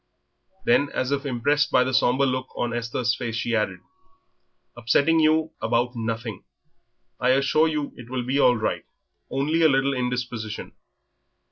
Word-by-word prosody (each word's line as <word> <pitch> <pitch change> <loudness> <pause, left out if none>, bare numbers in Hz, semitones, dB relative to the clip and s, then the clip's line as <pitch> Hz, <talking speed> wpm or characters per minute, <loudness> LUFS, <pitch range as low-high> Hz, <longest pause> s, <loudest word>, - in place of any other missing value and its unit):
Then, 140 +4 +3
as 130 +1 -1
if 140 0 -1
impressed 145 +4 +1
by 125 - +4
the 130 +1 -3
sombre 125 +4 +3
look 130 0 -1
on 120 -1 -1
Esther's 120 0 -1
face, 120 -2 -4
she 115 0 -1
added: 105 -1 -1 0.9
"Upsetting 140 +8 +2
you 155 0 +2
about 120 +2 0
nothing. 115 -2 -4 0.8
I 125 - +1
assure 140 +4 +3
you 150 -2 -3
it 120 -1 -12
will 130 -1 -2
be 135 +3 0
all 125 -3 +5
right; 110 - -2 0.4
only 150 +5 0
a 160 - +6
little 135 0 +2
indisposition." 125 -4 -4
125 Hz, 150 wpm, -24 LUFS, 120-140 Hz, 0.9 s, a